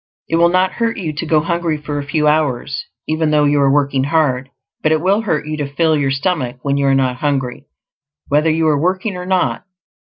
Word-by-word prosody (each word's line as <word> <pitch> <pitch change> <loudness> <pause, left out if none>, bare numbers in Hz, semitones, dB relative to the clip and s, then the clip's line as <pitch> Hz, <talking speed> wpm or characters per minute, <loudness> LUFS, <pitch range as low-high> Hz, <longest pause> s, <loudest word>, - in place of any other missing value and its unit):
It 165 - 0
will 170 +1 +5
not 185 +1 +2
hurt 230 -1 -2
you 160 -5 -3
to 160 +3 -5
go 155 -1 +3
hungry 170 -1 -1
for 145 -1 -4
a - - -3
few 150 +1 0
hours, 145 -3 0 0.2
even 155 0 0
though 150 -1 +3
you 145 0 +3
are 140 - +4
working 140 -2 +1
hard; 140 -4 +1 0.3
but 155 - +1
it 160 - +3
will 195 +6 +2
hurt 155 -9 -1
you 155 0 -3
to 145 -2 -4
fill 160 +1 +2
your 140 -2 0
stomach 135 -3 -1
when 140 -1 0
you 140 0 +1
are 135 - +4
not 130 -2 +1
hungry, 135 -1 -2 0.6
whether 150 +3 +2
you 160 0 +1
are 145 -2 +2
working 185 +3 -1
or 180 0 -6
not. 185 -1 0
150 Hz, 225 wpm, -17 LUFS, 140-165 Hz, 0.6 s, will